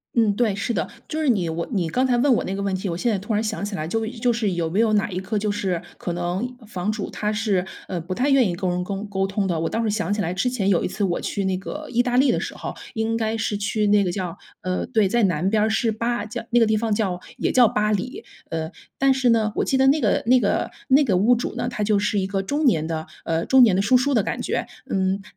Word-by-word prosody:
嗯， 225 -4 +3
对， 220 -3 +1
是 210 +4 -2
的。 165 -7 -1 0.2
就 315 - -3
是 305 - +2
你 195 -8 +2
我 165 +1 -3
你 185 -7 0
刚 255 +10 +1
才 250 -2 +2
问 260 +2 +4
我 - - +1
那 190 - -3
个 200 - -3
问 200 -1 -1
题， 190 +1 -3
我 170 - -3
现 235 +6 +1
在 205 - 0
突 205 +4 -6
然 215 0 +1
想 215 -2 -3
起 205 0 -3
来 155 -3 -3
就 225 +5 -1
就 240 +1 0
是 220 -4 0
有 170 -2 -1
没 175 +6 -1
有 225 -1 +3
哪 205 -2 +2
一 180 - -2
个 190 +3 -3
就 210 0 0
是 190 -4 -1 0.2
可 175 - -3
能 180 +8 -3
房 195 -1 -2
主 215 -2 -4
他 210 0 -2
是， 210 -4 0 0.2
呃， 175 -2 -3
不 180 +3 -5
太 255 +6 +1
愿 260 -6 +4
意 175 - -2
跟 185 +1 -2
人 180 0 -1
沟 195 +2 -4
沟 195 -2 -1
通 195 +1 -1
的。 175 -4 -1
我 165 - -1
倒 230 - -1
是 220 - 0
想 210 -1 -1
起 205 - 0
来 175 -3 -1
之 195 +7 0
前 220 -6 -1
有 190 -4 +3
一 - - 0
次 195 +3 -3
我 175 -3 0
去 200 - -2
那 190 -1 +1
个 300 +11 -7
意 240 0 +3
大 245 0 0
利 265 0 +5
的 - - 0
时 - - -5
候， - - -5 0.2
应 220 0 0
该 225 0 -1
是 215 -1 -1
去 210 +1 -1
那 205 0 +4
个 180 - -1
叫 180 -2 -4 0.3
呃， 185 0 -2
对， 220 -5 +2
在 235 +5 +1
南 180 -2 +1
边 215 +2 +2
儿， 220 - +2
是 220 +1 +1
巴 230 0 -2
叫 215 - -6
那 240 - +4
个 230 - +5
地 220 0 +2
方 220 +1 -1
叫 195 -4 -1 0.2
也 - - 0
叫 250 -2 +6
巴 210 0 0
黎。 250 - -3 0.2
呃， 160 0 -3 0.3
但 270 0 +4
是 260 -2 +2
呢， 220 -2 +3
我 - - +2
记 265 - +1
得 265 - +4
那 290 +3 +4
个 - - +2
那 250 +2 +5
个 200 -4 0 0.2
那 275 +3 +5
个 205 -9 +2
屋 225 +7 +4
主 240 - -3
呢， 245 - -2
他 225 -4 -3
就 205 -1 +2
是 205 +1 0
一 190 - +1
个 195 0 -1
中 290 +10 -1
年 160 - +3
的， 160 -1 -3 0.2
呃， 165 0 0
中 265 0 +5
年 220 -7 +6
的 190 - +2
叔 225 +5 +4
叔 255 +2 +3
的 220 - +3
感 - - -3
觉。 - - -1 0.2
嗯， 190 +1 0
210 Hz, 315 characters per minute, -23 LUFS, 190-235 Hz, 0.3 s, 叫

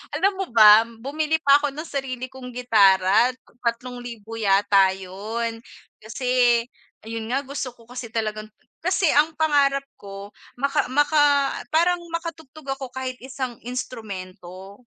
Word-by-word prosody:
alam 385 +6 +2
mo 385 0 -3
ba 215 -1 +8
bumili 290 +8 -2
pa 280 -2 +5
ako 290 -1 -2
ng 310 +4 -7
sarili 255 -2 -4
kong 255 -1 -10
gitara, 220 -2 +4 0.3
3,000 235 -2 -5
yata 195 -2 +3
yun. 220 +5 -5 0.4
Kasi 245 0 +2 0.5
ayun 225 0 -5
nga 265 - +1
gusto 275 -2 -4
ko 230 -1 -21
kasi 245 -2 -8
talagang 215 -1 -3 0.3
kasi 365 0 +1
ang 300 +2 +4
pangarap 280 -3 +2
ko, 200 0 -10 0.2
maka 275 -2 0
maka 290 +2 +3 0.5
parang 345 +2 +2
makatugtog 320 -4 -7
ako 265 -2 -8
kahit 260 -1 -4
isang 260 -2 -5
instrumento. 195 -4 -8
245 Hz, 130 wpm, -23 LUFS, 220-280 Hz, 0.5 s, ba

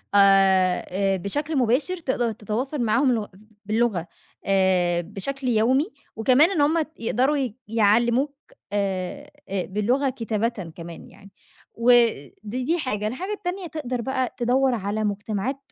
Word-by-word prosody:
آآ، 195 -2 +5 0.3
آآ، - - 0
بشكل 290 - -2
مباشر، 260 +9 +1
تقدر 255 -7 -1
تتواصل 235 +6 -3
معاهم 245 +4 +2
لغ 220 -3 -1 0.4
باللغة 215 -5 0 0.4
آآ، 185 -3 +2
بشكل 255 +10 -5
يومي، 250 - +2 0.3
وكمان 255 - +4
إن 325 -7 +1
هُم 315 +3 +3 0.2
يقدروا 260 +5 +1
ي 255 -6 -2
يعلّموك 235 +5 +2 0.4
آآ، 200 +8 -2 0.2
آآ، 190 -2 -2
باللغة 240 +8 0
كتابةً 225 -6 -3
كمان 170 -1 -9
يعني، 200 0 -17 0.4
ود 230 - +3
دي 255 +10 -1
حاجة. 215 -9 -2
الحاجة 360 - -4
التانية 375 -2 -4
تقدر 260 -6 -4
بقى 260 0 -2
تدوّر 255 +2 +2
على 210 0 -2
مجتمعات 210 +4 -2
235 Hz, 130 wpm, -24 LUFS, 200-270 Hz, 0.4 s, آآ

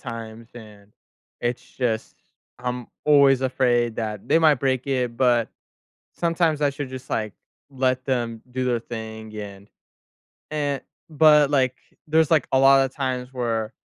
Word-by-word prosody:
times, 115 0 -8
and 105 -3 -14 0.5
it's 120 0 -2
just 115 -4 -3 0.4
I'm 125 -1 -4 0.2
always 140 -3 +5
afraid 120 -3 +1
that 105 -3 -4
they 165 - +5
might 155 -2 +5
break 130 0 -1
it, 125 -3 -1
but 120 -3 +2 0.7
sometimes 165 -3 0
I 145 - +3
should 140 -1 -6
just, 130 -1 -9
like, 110 -3 -2 0.4
let 130 -1 0
them 120 -4 -2
do 130 0 -2
their 120 -2 +1
thing, 110 -2 -8
and, 100 -1 -8 0.8
eh 145 -2 -1 0.3
but, 150 -2 +5
like, 130 -2 +2 0.3
there's, 160 +1 +2
like, 155 -5 +3
a - - +5
lotta 135 0 +5
times 130 -2 -3
where 115 -3 -2
125 Hz, 145 wpm, -23 LUFS, 115-140 Hz, 0.8 s, always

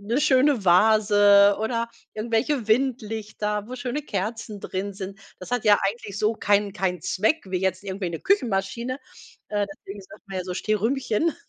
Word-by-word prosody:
'ne 230 +7 -1
schöne 275 -4 +3
Vase 205 +1 +5
oder 230 +1 -1 0.3
irgendwelche 225 +3 -1
Windlichter, 215 -4 -1
wo 255 - -6
schöne 250 +4 -3
Kerzen 210 -2 -4
drin 195 +2 -4
sind. 195 0 -7 0.2
Das 185 - -10
hat 245 -2 -1
ja 205 -1 +6
eigentlich 205 -2 -6
so 215 +2 +1
keinen 205 -1 +1
keinen 185 -4 -1
Zweck, 220 - 0
wie 185 -1 -2
jetzt 190 0 -1
irgendwie 190 -2 -4
'ne 165 - -4
Küchenmaschine, 235 - 0 0.5
äh, 205 -1 0
deswegen 200 +1 -10
sagt 190 - -15
man, 190 -1 -4
ja, 180 - -4
so 180 - -4
Stehrümchen. 225 - 0
210 Hz, 160 wpm, -24 LUFS, 195-235 Hz, 0.5 s, ja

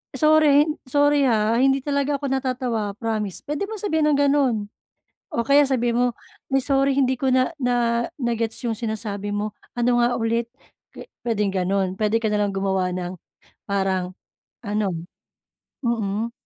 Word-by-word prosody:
"Sorry 305 -2 +5
hin 305 0 -4
sorry 290 +1 +3
ha, 225 0 +2
hindi 270 0 +3
talaga 280 0 0
ako 280 - -4
natatawa 250 -6 -1
promise." 215 -3 -3
Puwede 295 +7 -3
mong 435 -2 -6
sabihin 320 -6 +1
ang 300 - +3
ganun. 280 -3 +3 0.7
O 235 - -1
kaya 280 +2 +5
sabihin 240 -3 +1
mo, 245 - +4 0.5
"Ay 270 -1 +2
sorry 275 0 +2
hindi 260 -2 +1
ko 270 - 0
na 255 +5 +2
na 240 -2 +1
na-gets 235 -4 -2
'yong 230 -2 -1
sinasabi 210 -3 -3
mo, 210 +1 -2 0.2
ano 240 0 +2
nga 240 0 +2
ulit?" 230 0 0 0.5
Pwe - - -9 0.2
puwedeng 210 -4 0
gano'n, 190 0 0
puwede 215 +1 +2
ka 215 - +1
na 210 - +1
lang 205 - +1
gumawa 190 -1 0
ng 180 0 -4 0.5
parang 190 -2 -1 0.5
ano, 205 -3 -1 0.9
mm. 225 -1 -1
235 Hz, 155 wpm, -23 LUFS, 210-275 Hz, 0.9 s, Sorry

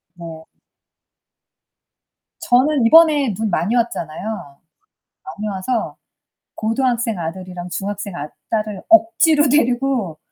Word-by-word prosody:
네. 165 -2 -10 2.0
저는 260 +1 +3
이번에 295 -4 +5
눈 220 +3 -2
많이 200 +5 0
왔잖아요. 205 - -4 0.7
많이 215 - -6
와서 210 +4 -3 0.6
고등학생 230 -1 -1
아들이랑 180 +1 -6
중학생 200 +1 -5
아 150 -2 -5 0.2
딸을 215 -3 -2
억지로 330 -2 +4
데리고 250 - 0
220 Hz, 215 characters per minute, -19 LUFS, 185-265 Hz, 2.0 s, 이번에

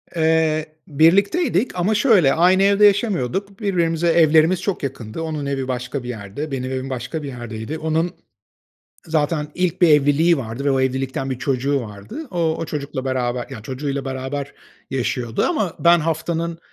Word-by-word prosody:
Eee, 160 -1 +2 0.2
birlikteydik 200 - +2
ama, 190 +5 +1
şöyle, 205 - +4
aynı 185 +3 +4
evde 200 +1 +5
yaşamıyorduk. 200 - +1
Birbirimize 170 -5 0
evlerimiz 160 +1 +4
çok 195 -7 -2
yakındı. 130 0 -5
Onun 155 -3 -3
evi 135 -2 -2
başka 125 +1 -3
bir 125 - -7
yerde, 115 +7 -6
benim 130 -1 -3
evim 130 +1 -3
başka 130 +5 -4
bir - - -5
yerdeydi. 120 +3 -6
Onun 160 +2 0 0.9
zaten 155 -1 0
ilk 180 0 -1
bir 170 - +6
evliliği 150 +3 +4
vardı 120 +2 -5
ve 140 - +3
o 135 - +1
evlilikten 130 +1 -2
1 130 -1 -4
çocuğu 135 +2 0
vardı. 110 - -8
O, 165 -2 0
o 165 - -2
çocukla 140 -3 -5
beraber, 125 -2 -1
yani, 105 - -8
çocuğuyla 135 +3 -4
beraber 135 +2 -4 0.4
yaşıyordu 120 -2 -1
ama 215 - 0
ben 170 0 +5
haftanın, 165 +1 -2
150 Hz, 160 wpm, -21 LUFS, 130-170 Hz, 0.9 s, bir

